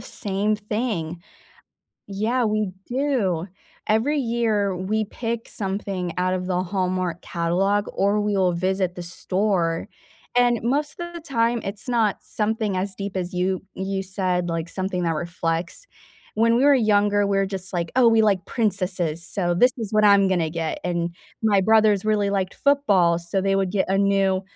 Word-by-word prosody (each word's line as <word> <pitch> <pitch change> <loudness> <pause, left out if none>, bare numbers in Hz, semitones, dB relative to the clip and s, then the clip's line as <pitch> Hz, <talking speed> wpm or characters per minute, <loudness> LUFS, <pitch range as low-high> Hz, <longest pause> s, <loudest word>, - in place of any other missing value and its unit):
same 205 +1 -2
thing. 205 -6 -3 0.8
Yeah, 220 +5 0
we 215 -3 0
do. 240 - 0 0.4
Every 235 +8 +2
year, 225 -5 0
we 215 +4 -1
pick 230 +2 -4
something 190 -3 -3
out 185 +1 +1
of 180 0 -3
the 180 -1 0
Hallmark 185 -2 -2
catalog, 190 +4 0
or 200 +2 +1
we 205 -1 0
will 185 -2 +2
visit 185 +1 -1
the 175 - -5
store, 180 0 -1 0.5
and 245 -1 +4
most 290 +7 -1
of 345 0 -6
the 340 - -6
time 235 -5 0
it's 200 +5 -6
not 225 -4 +1
something 215 -2 -1
as 190 +1 -2
deep 195 -1 -5
as 180 0 -3
you 185 +1 -1
you 190 0 -3
said, 185 -2 -1
like, 165 0 -2
something 185 -1 -3
that 165 - +1
reflects. 170 - -3 0.5
When 230 +2 +3
we 260 - +3
were 285 -1 +6
younger, 205 -3 +3
we're 195 -1 +1
just 190 -1 -4
like, 170 -2 -2
"Oh, 245 -2 +6
we 225 -1 +4
like 200 -5 +2
princesses, 185 -7 -1
so 175 -3 -1
this 250 +8 +5
is 220 -4 -4
what 215 0 +4
I'm 200 -1 +6
gonna 175 -4 +1
get," 165 -1 -3
and 170 -1 -2 0.3
my 205 -3 +3
brothers 215 -1 +4
really 210 -2 +1
liked 195 -2 -1
football, 200 -13 +3
so 175 +3 -2
they 195 0 +1
would 190 -2 0
get 195 - +1
a 195 - +2
new 195 -1 +2
195 Hz, 170 wpm, -23 LUFS, 180-215 Hz, 0.8 s, were